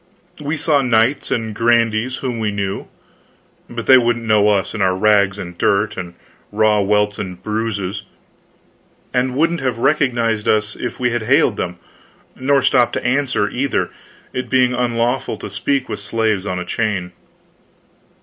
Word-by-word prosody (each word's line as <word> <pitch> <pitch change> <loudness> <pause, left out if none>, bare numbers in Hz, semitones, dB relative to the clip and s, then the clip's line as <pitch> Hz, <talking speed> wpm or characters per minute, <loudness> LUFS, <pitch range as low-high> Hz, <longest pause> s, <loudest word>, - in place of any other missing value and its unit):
We 150 +2 -2
saw 150 -2 +2
knights 125 +2 +2
and 110 -2 -2
grandees 115 +2 +1
whom 120 -3 -2
we 110 -1 0
knew, 100 -1 -3 0.8
but 120 -1 -5
they 130 - +8
didn't 120 -1 +1
know 105 -1 +4
us 100 -2 +1
in 105 - -3
our 95 -1 +2
rags 100 -1 +3
and 90 -3 -7
dirt 100 +4 +1
and 90 -2 -7 0.4
raw 105 0 +3
welts 105 +1 +1
and 90 -2 -5
bruises, 105 -2 -2 1.1
and 125 0 0
wouldn't 165 +3 +1
have 130 -3 -1
recognized 120 -5 +1
us 105 0 +1
if 120 - -5
we 125 -1 +1
had 120 0 -1
hailed 110 - +3
them, 90 0 -3 0.6
nor 135 +1 +2
stopped 125 -3 +3
to - - -3
answer, 125 -4 +1
either, 135 +1 -1 0.4
it 125 - -4
being 125 -1 +3
unlawful 120 +1 -1
to - - -8
speak 140 -1 -1
with - - -5
slaves 105 -2 -1
on 90 - -2
a 90 - -4
chain. 100 -6 -2
115 Hz, 160 wpm, -19 LUFS, 105-125 Hz, 1.1 s, they